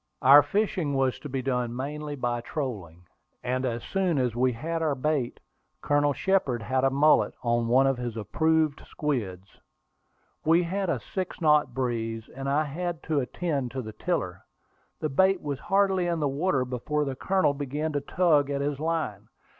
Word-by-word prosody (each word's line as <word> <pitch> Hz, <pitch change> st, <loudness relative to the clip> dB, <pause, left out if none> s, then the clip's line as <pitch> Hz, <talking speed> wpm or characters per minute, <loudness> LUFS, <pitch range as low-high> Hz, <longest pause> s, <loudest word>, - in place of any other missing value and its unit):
Our 140 Hz, +3 st, +9 dB
fishing 175 Hz, -2 st, -1 dB
was 135 Hz, -1 st, +1 dB
to 145 Hz, -, -8 dB
be 130 Hz, -1 st, -3 dB
done 125 Hz, -2 st, -1 dB
mainly 145 Hz, +3 st, -4 dB
by 120 Hz, -3 st, -2 dB
trolling, 100 Hz, -, -5 dB, 0.4 s
and 130 Hz, +1 st, -1 dB
as 120 Hz, -1 st, -3 dB
soon 185 Hz, -5 st, 0 dB
as 125 Hz, -4 st, 0 dB
we 125 Hz, +1 st, +2 dB
had 165 Hz, +7 st, -3 dB
our 155 Hz, -3 st, +1 dB
bait, 140 Hz, -2 st, -1 dB, 0.4 s
Colonel 145 Hz, 0 st, +2 dB
Shepard 140 Hz, -, 0 dB
had 130 Hz, +4 st, 0 dB
a 135 Hz, -, +5 dB
mullet 145 Hz, +3 st, +3 dB
on 120 Hz, -1 st, +1 dB
one 130 Hz, +3 st, +4 dB
of 135 Hz, -2 st, +1 dB
his 120 Hz, -2 st, -4 dB
approved 155 Hz, +7 st, +1 dB
squids. 100 Hz, -11 st, -4 dB, 0.8 s
We 165 Hz, +3 st, +4 dB
had 190 Hz, +2 st, -2 dB
a -, -, 0 dB
six 185 Hz, -2 st, -5 dB
knot 150 Hz, -6 st, +3 dB
breeze, 115 Hz, -3 st, -2 dB
and 135 Hz, +1 st, -5 dB
I 145 Hz, +3 st, +2 dB
had 170 Hz, +3 st, -4 dB
to 155 Hz, -3 st, 0 dB
attend 140 Hz, -1 st, -2 dB
to 130 Hz, -1 st, -3 dB
the 110 Hz, -1 st, -8 dB
tiller. -, -, -2 dB, 0.6 s
The 155 Hz, -, 0 dB
bait 190 Hz, +6 st, +3 dB
was 140 Hz, -2 st, -4 dB
hardly 195 Hz, -1 st, +2 dB
in 170 Hz, -1 st, 0 dB
the 150 Hz, -, +1 dB
water 140 Hz, -1 st, 0 dB
before 140 Hz, +4 st, -2 dB
the 135 Hz, -1 st, -3 dB
Colonel 185 Hz, 0 st, +1 dB
began 145 Hz, +3 st, -3 dB
to 145 Hz, -, 0 dB
tug 150 Hz, -2 st, +2 dB
at 140 Hz, 0 st, -1 dB
his 140 Hz, -1 st, -2 dB
line. 155 Hz, -11 st, -2 dB
140 Hz, 180 wpm, -27 LUFS, 125-160 Hz, 0.8 s, Our